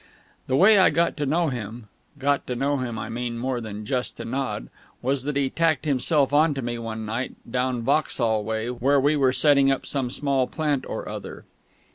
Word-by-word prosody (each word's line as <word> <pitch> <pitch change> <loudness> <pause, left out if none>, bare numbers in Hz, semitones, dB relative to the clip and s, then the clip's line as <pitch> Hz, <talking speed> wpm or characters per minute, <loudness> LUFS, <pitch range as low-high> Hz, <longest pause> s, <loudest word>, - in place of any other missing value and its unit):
The 130 - +1
way 200 +7 +6
I 190 - +6
got 170 +3 +1
to 145 -2 -1
know 165 +3 +2
him 115 -2 -6 0.3
(got 140 0 0
to 125 - -2
know 140 +3 0
him, 120 -3 -3
I 110 0 -4
mean, 120 +1 -4
more 125 0 -2
than 105 -1 -7
just 125 +2 -2
to - - -6
nod) 130 - -3 0.3
was 135 +1 -1
that 150 -1 -2
he 140 -2 0
tacked 165 -2 +1
himself 140 0 +2
on 150 0 +4
to 135 - -4
me 120 0 -3
one 110 -1 -5
night 115 +4 -3
down 125 0 -1
Vauxhall 115 -5 +1
way, 110 +2 -2
where 135 +4 +2
we 145 +3 +3
were 135 -3 +3
setting 140 +1 +4
up 135 - 0
some 135 -3 -2
small 135 -1 0
plant 150 -4 -1
or - - -5
other. - - -7
130 Hz, 205 wpm, -24 LUFS, 120-145 Hz, 0.3 s, way